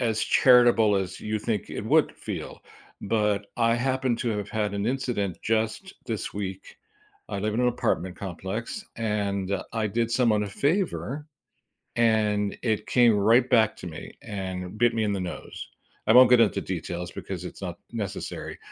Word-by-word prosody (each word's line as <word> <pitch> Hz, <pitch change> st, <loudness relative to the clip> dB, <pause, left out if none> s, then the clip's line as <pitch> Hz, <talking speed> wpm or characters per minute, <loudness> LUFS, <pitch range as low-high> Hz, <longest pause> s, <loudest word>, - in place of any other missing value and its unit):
as 110 Hz, -2 st, 0 dB
charitable 120 Hz, -5 st, +5 dB
as 95 Hz, -1 st, -3 dB
you 110 Hz, 0 st, -2 dB
think 105 Hz, -2 st, -3 dB
it -, -, -5 dB
would -, -, +3 dB
feel, -, -, -6 dB, 0.4 s
but 105 Hz, -1 st, 0 dB
I 115 Hz, -1 st, +3 dB
happen 130 Hz, 0 st, 0 dB
to 120 Hz, -4 st, -1 dB
have 105 Hz, 0 st, -4 dB
had 105 Hz, -2 st, -1 dB
an 100 Hz, +2 st, -1 dB
incident 120 Hz, -8 st, -1 dB
just 115 Hz, -, -1 dB
this 110 Hz, -4 st, -4 dB
week. 95 Hz, -2 st, -6 dB, 0.5 s
I -, -, -3 dB
live 105 Hz, +1 st, -1 dB
in 120 Hz, -, +1 dB
an 125 Hz, -, +4 dB
apartment 95 Hz, -6 st, -1 dB
complex, 100 Hz, -, -5 dB
and 100 Hz, -3 st, -1 dB, 0.2 s
I 110 Hz, -2 st, 0 dB
did 115 Hz, +2 st, -1 dB
someone 115 Hz, -4 st, +3 dB
a 105 Hz, -, -3 dB
favor, 150 Hz, -, -1 dB, 0.7 s
and 105 Hz, -3 st, +2 dB
it 110 Hz, -3 st, 0 dB
came 120 Hz, -4 st, +4 dB
right 115 Hz, +5 st, +4 dB
back 110 Hz, -2 st, +4 dB
to 90 Hz, -, -8 dB
me 80 Hz, -2 st, -8 dB
and 95 Hz, -2 st, -5 dB
bit 120 Hz, 0 st, +3 dB
me 110 Hz, -1 st, +1 dB
in 105 Hz, -, 0 dB
the 95 Hz, -, -2 dB
nose. 90 Hz, -, -7 dB, 0.4 s
I 110 Hz, -, +5 dB
won't 125 Hz, 0 st, +8 dB
get 125 Hz, -2 st, +7 dB
into 110 Hz, -, +3 dB
details 90 Hz, -1 st, -5 dB
because -, -, -6 dB
it's -, -, -9 dB
not -, -, -5 dB
necessary, 100 Hz, -4 st, -5 dB
110 Hz, 170 wpm, -26 LUFS, 100-120 Hz, 0.7 s, won't